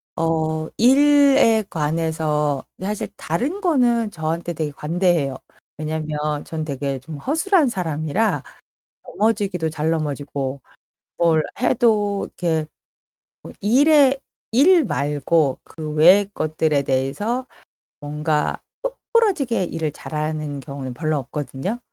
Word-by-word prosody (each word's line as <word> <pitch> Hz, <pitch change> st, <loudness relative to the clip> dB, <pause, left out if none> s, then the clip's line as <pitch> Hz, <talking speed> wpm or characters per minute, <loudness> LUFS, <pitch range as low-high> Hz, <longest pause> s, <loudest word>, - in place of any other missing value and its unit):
어 160 Hz, -1 st, 0 dB
일에 275 Hz, -3 st, +5 dB
관해서 155 Hz, -2 st, -1 dB, 0.2 s
사실 205 Hz, +2 st, -3 dB
다른 270 Hz, -, -2 dB
거는 240 Hz, -, +2 dB
저한테 165 Hz, +1 st, -3 dB
되게 155 Hz, -2 st, -3 dB
관대해요. 160 Hz, -2 st, 0 dB, 0.4 s
왜냐면 150 Hz, -1 st, -3 dB
전 160 Hz, -1 st, -4 dB
되게 140 Hz, -2 st, -3 dB
좀 145 Hz, +4 st, -9 dB
허술한 325 Hz, -, +2 dB
사람이라 170 Hz, +1 st, -1 dB, 0.6 s
넘어지기도 200 Hz, -6 st, 0 dB
잘 155 Hz, 0 st, -2 dB
넘어지고 140 Hz, -3 st, -3 dB, 0.6 s
뭘 165 Hz, -2 st, +3 dB, 0.2 s
해도 215 Hz, -5 st, +2 dB
이렇게 160 Hz, -3 st, -2 dB, 0.8 s
뭐 -, -, -10 dB
일에 275 Hz, +5 st, +5 dB, 0.3 s
일 310 Hz, +7 st, +5 dB
말고 145 Hz, -, 0 dB
그 155 Hz, -2 st, -7 dB
외의 185 Hz, +6 st, +6 dB
것들에 155 Hz, -3 st, 0 dB
대해서 140 Hz, -, -1 dB, 0.5 s
뭔가 150 Hz, +1 st, -1 dB, 0.2 s
똑 -, -, -4 dB, 0.2 s
부러지게 335 Hz, -, +2 dB
일을 160 Hz, -3 st, -3 dB
잘하는 155 Hz, -1 st, -4 dB
경우는 135 Hz, -1 st, -6 dB
별로 155 Hz, +3 st, -1 dB
없거든요. 145 Hz, -, -4 dB
160 Hz, 240 characters per minute, -21 LUFS, 150-225 Hz, 0.8 s, 외의